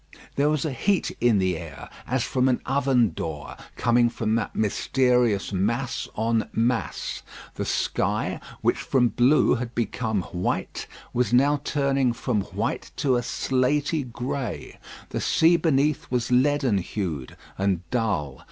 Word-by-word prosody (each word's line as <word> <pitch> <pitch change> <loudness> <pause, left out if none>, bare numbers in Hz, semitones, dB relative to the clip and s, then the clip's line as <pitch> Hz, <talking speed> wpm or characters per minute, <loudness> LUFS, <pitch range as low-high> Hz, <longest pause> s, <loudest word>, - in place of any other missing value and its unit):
There 145 +2 +3
was 155 -1 0
a 155 - -1
heat 195 +9 0
in 120 -3 +4
the 95 -2 +1
air 80 -3 -8 0.2
as 125 -1 0
from 130 0 +1
an 125 - +1
oven 130 -5 +2
door, 75 -3 -5 0.2
coming 120 0 +3
from 110 -2 -2
that 115 -2 -1
mysterious 120 -1 +1
mass 115 +7 -1
on 115 +1 0
mass. 115 -2 -1 0.3
The - - -4
sky, - - -1 0.2
which - - +1
from 125 -3 +2
blue 130 +7 +4
had 120 -1 -3
become 110 -3 -1
white, 90 +1 -3 0.3
was 125 0 +1
now 140 +3 +4
turning 135 -4 +1
from 115 -2 -1
white - - -3
to 135 -3 +1
a 120 - +1
slatey 140 +5 0
grey. 125 +2 -4 0.3
The - - -3
sea 165 +2 +4
beneath 150 -2 +1
was 125 -1 -1
leaden 130 -4 +3
hued 85 - -4 0.2
and 95 -3 -1
dull. 100 - -1
120 Hz, 145 wpm, -25 LUFS, 105-135 Hz, 0.3 s, in